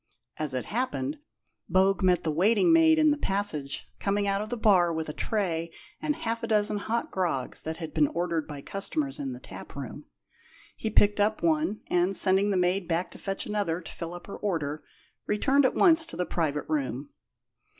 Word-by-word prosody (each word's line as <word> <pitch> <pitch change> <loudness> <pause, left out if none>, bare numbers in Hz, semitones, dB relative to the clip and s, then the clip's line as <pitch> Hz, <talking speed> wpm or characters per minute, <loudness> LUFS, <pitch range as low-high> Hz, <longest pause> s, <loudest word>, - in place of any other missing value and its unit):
As 150 -4 -3
it 125 - -2
happened, 260 +5 -2 0.5
Bogue 190 0 +3
met 180 -2 +3
the 160 - 0
waiting 215 - +4
maid 325 -1 +6
in 310 -1 +5
the 295 - -1
passage, 190 - -2
coming 200 0 0
out 195 0 +1
of 215 - -5
the 245 - -3
bar 185 -6 +4
with 160 -1 -3
a - - -4
tray 170 -7 -1 0.3
and 305 -1 0
half 230 -3 -3
a 230 - -3
dozen 210 -1 +1
hot 230 +3 -2
grogs 170 -9 -2
that 160 0 -5
had 160 -2 -7
been 150 -2 +3
ordered 170 -1 -2
by 145 -2 -8
customers 275 +9 -2
in 275 -3 -3
the 250 - -8
tap - - -11
room. - - -7 0.7
He 220 - -3
picked 205 0 +3
up 215 +1 +1
one, 310 -8 +1
and, 180 +2 +1
sending 190 +2 +4
the 195 - +1
maid 180 0 +1
back 170 +1 -1
to - - -12
fetch 195 -1 -3
another 205 -6 -1
to 165 - -10
fill 170 +1 -6
up 175 - -10
her 200 - -8
order, 155 -7 -2 0.4
returned 265 +7 +3
at - - +2
once 330 -3 +5
to - - -8
the 180 - 0
private 150 -5 -1
room. 140 -3 -2
195 Hz, 200 wpm, -28 LUFS, 165-225 Hz, 0.7 s, maid